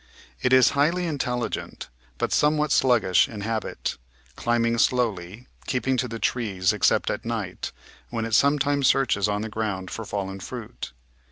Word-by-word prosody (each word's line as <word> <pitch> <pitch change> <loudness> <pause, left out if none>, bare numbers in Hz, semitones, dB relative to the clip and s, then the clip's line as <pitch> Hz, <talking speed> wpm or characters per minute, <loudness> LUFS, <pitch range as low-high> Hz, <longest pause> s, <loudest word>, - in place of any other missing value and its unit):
It 125 - +1
is 130 -2 +6
highly 165 +6 +2
intelligent, 125 -7 -3 0.3
but - - -1
somewhat 150 0 +2
sluggish 120 -10 +4
in 105 -3 -7
habit, 110 +1 -3 0.4
climbing 115 0 +1
slowly, 115 -3 0 0.2
keep 125 -1 -2
ing 130 - +3
to 125 - 0
the 115 -1 -5
trees 100 -7 0
except - - +2
at - - -4
night, - - -4 0.4
when 115 -1 -2
it 115 - -5
sometimes 140 +2 +3
searches 105 -7 +2
on 105 +1 -1
the - - -3
ground 105 -4 -3
for 115 - -5
fallen 95 -2 -4
fruit. 115 +3 -7
115 Hz, 155 wpm, -25 LUFS, 105-130 Hz, 0.4 s, is